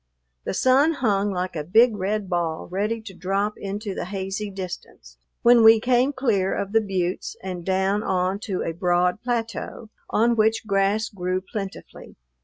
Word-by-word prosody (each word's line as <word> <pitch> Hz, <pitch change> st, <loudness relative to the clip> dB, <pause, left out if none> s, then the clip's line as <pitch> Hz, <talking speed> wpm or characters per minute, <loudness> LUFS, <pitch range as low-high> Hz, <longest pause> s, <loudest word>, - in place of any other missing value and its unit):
The -, -, -2 dB
sun 270 Hz, -, +4 dB
hung 205 Hz, -7 st, +1 dB
like 180 Hz, -2 st, -3 dB
a 150 Hz, -, -2 dB
big 220 Hz, +8 st, +4 dB
red 205 Hz, +1 st, -2 dB
ball 170 Hz, -3 st, -2 dB
ready 210 Hz, +4 st, -1 dB
to 205 Hz, -3 st, -9 dB
drop 195 Hz, +4 st, -1 dB
into 200 Hz, +1 st, -5 dB
the -, -, -4 dB
hazy 195 Hz, +2 st, -4 dB
distance 175 Hz, -, -9 dB, 0.2 s
when 235 Hz, -1 st, +6 dB
we 225 Hz, 0 st, +8 dB
came 250 Hz, +3 st, +2 dB
clear 225 Hz, -9 st, 0 dB
of 200 Hz, -, -3 dB
the 225 Hz, +1 st, +4 dB
buttes 185 Hz, -3 st, -2 dB
and 180 Hz, -2 st, -5 dB
down 190 Hz, +2 st, +1 dB
on 185 Hz, 0 st, 0 dB
to 190 Hz, -4 st, -2 dB
a 165 Hz, -, -3 dB
broad 180 Hz, +3 st, +1 dB
plateau, 230 Hz, -2 st, -4 dB, 0.2 s
on 235 Hz, +2 st, +2 dB
which 220 Hz, 0 st, +2 dB
grass 200 Hz, +2 st, +1 dB
grew 185 Hz, -2 st, -2 dB
plentifully. 195 Hz, 0 st, -8 dB
200 Hz, 165 wpm, -24 LUFS, 185-225 Hz, 0.2 s, we